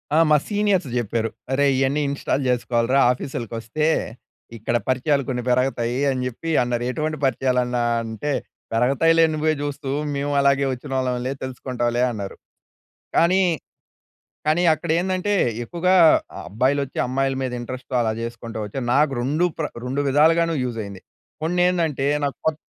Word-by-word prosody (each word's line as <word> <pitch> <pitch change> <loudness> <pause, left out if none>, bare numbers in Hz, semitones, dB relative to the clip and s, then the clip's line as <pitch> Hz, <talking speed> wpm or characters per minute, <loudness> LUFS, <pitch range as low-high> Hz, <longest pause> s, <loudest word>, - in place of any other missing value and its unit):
ఆ! - - +4
మా 150 - +6
సీనియర్స్ 205 -6 +1
చెప్పారు. 115 0 -1 0.2
"అరేయ్! 140 0 +3
ఇవన్నీ 135 +2 +1
ఇంస్టాల్ 140 0 -1
చేసుకోవాలి 120 0 +1 0.2
ఆఫీస్‌లకి 125 -3 -5
వస్తే. 115 +7 -2 0.7
ఇక్కడ 115 +2 -2
పరిచయాలు 140 +2 +1
కొన్ని 125 -2 -2
పెరగతాయి" 125 -1 +1
అని 130 -1 -2
చెప్పి 145 +7 -5
అన్నారు. 120 -1 -1
ఎటువంటి 155 +3 -2
పరిచయాలు 130 0 +1
అన్న 125 0 -2 0.3
అంటే, 115 +6 -4 0.4
"పెరుగుతాయిలే 150 +8 +4
నువ్వే 155 +1 +1
చూస్తూ. 145 -1 -4 0.2
మేము 140 +1 -1
అలాగే 140 0 +3
వచ్చినాళ్ళంలే 130 -1 -2
తెలుసుకుంటావులే" 125 -2 -2
అన్నారు. 100 -4 -6 0.8
కానీ 185 +3 +4 1.0
కానీ 155 +3 +3
అక్కడ 155 +1 -6
ఏందంటే 185 +2 -1 0.3
ఎక్కువగా 175 +8 0 0.5
అబ్బాయిలు 130 +7 +1
వచ్చి 135 - -9
అమ్మాయిల 135 +1 0
మీద 130 -1 -2
ఇంటరెస్ట్‌తో 130 +2 -7
అలా 110 -2 +1
చేసుకుంటూ 115 -1 -6
వచ్చిరు. 120 +5 -5
నాకు 145 0 +3
2 145 +8 +1
ప్ర 155 - 0 0.2
2 130 +3 -2
విధాలుగాను 165 +4 +3
యూజ్ 120 -2 -3
అయింది. 100 -2 -8 0.4
కొన్ని 175 +3 0
ఏందంటే 160 -6 0 0.2
నాకు 140 - -2
కొత్త 160 -1 +1
135 Hz, 140 wpm, -22 LUFS, 125-155 Hz, 1.0 s, మా